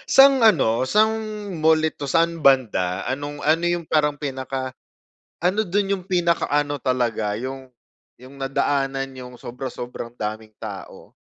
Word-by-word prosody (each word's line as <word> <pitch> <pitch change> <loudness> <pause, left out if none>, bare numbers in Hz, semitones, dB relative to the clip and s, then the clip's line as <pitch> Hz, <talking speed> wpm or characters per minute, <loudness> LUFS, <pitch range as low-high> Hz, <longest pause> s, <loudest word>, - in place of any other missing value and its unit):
Sa'ng 270 -1 +8
ano, 135 - +4
sa'ng 215 +1 +4 0.5
mall 160 0 +5
ito 155 -2 -3
saan 165 +2 +1
banda? 105 -10 +2
Anong 145 +3 -4
ano, 160 +3 +3
yung 175 -1 -1
parang 150 -2 +1
pinaka, 130 -2 -4 0.7
ano 200 +5 +1
do'n 195 +2 0
yung 180 - -13
pinakaano 165 -5 +1
talaga 120 -5 0
yung, 130 +3 -6 0.5
yung 130 +2 -13
nadaanan 135 0 0
n'yong 125 -1 -10
sobra-sobrang 120 -1 -6
daming 110 -1 -5
tao? 105 -3 -9
135 Hz, 130 wpm, -23 LUFS, 125-165 Hz, 0.7 s, Sa'ng